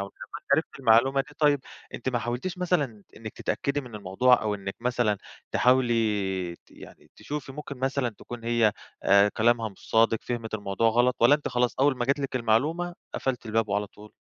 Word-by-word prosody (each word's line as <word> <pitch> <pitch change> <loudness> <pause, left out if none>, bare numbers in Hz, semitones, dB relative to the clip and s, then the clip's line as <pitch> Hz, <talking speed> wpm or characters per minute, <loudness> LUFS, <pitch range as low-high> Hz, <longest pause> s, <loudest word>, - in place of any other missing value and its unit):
لمّا 100 - -3
أنتِ - - -7
عرفتِ - - -2
المعلومة 130 +5 +4
دي 145 +2 -8
طيب، 145 -2 +3 0.3
أنتِ 125 - -4
ما 125 -2 0
حاولتيش 120 - -4
مثلًا 145 - -1
إنِّك 110 -1 -8
تتأكدي 140 +1 -2
من 125 -5 -12
الموضوع، 105 +6 +3
أو 105 -1 0
إنِّك 95 -1 -6
مثلًا 120 -4 0 0.3
تحاولي 105 -8 +1
ت - - -32
يعني - - -15
تشوفي 145 -2 -6
ممكن 140 -2 -8
مثلًا 135 -1 0
تكون 120 -1 -9
هي 115 -2 +3 0.3
آآ 100 +1 +5
كلامها 115 +1 +1
مش 100 - -16
صادق، 115 0 +4
فهمت 115 -2 -4
الموضوع 105 +2 0
غلط؟ 120 +2 +2
والَّا 120 +5 +7
أنتِ 150 - -2
خلاص 125 0 0
أول 140 -1 +3
ما 120 - -1
جات 140 +3 +1
لِك 135 -2 -2
المعلومة، 150 +10 0 0.2
قفلتِ 125 -3 -2
الباب 110 0 0
وعلى 105 +1 0
طول؟ 105 +1 -16
120 Hz, 185 wpm, -26 LUFS, 110-135 Hz, 0.3 s, والَّا